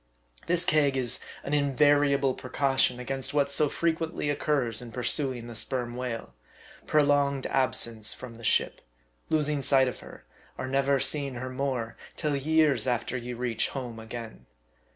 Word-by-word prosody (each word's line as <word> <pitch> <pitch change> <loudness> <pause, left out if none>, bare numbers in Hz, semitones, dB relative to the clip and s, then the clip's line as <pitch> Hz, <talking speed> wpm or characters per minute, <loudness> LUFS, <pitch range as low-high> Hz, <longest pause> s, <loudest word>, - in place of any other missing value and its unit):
This 175 0 +1
keg 145 -5 +3
is 125 -3 +3 0.2
an 145 - -4
in 140 -2 +1
variable 145 -1 +4
precaution 130 -1 0
against 135 +2 -3
what 140 -1 +2
so 150 +1 +4
frequently 165 -2 -1
occurs 140 -6 0
in 120 -1 -8
pursuing 125 +1 0
the 120 - -8
sperm 120 +2 -1
whale 125 - -5 0.5
prolonged 145 -2 +2
absence 115 -4 +1
from 125 -2 -7
the 115 0 -13
ship, - - +1 0.5
losing 150 -2 +1
sight 135 -1 +4
of 125 - -5
her, - - -13 0.3
or 130 - -4
never 135 +1 +2
seeing 140 0 -1
her 130 +1 -5
more, 130 -4 -3 0.2
till 150 -3 -1
years 155 0 +2
after 120 0 -1
you 125 0 -5
reach 120 -2 -1
home 125 -4 -6
again. 110 - -8
135 Hz, 155 wpm, -28 LUFS, 120-145 Hz, 0.5 s, variable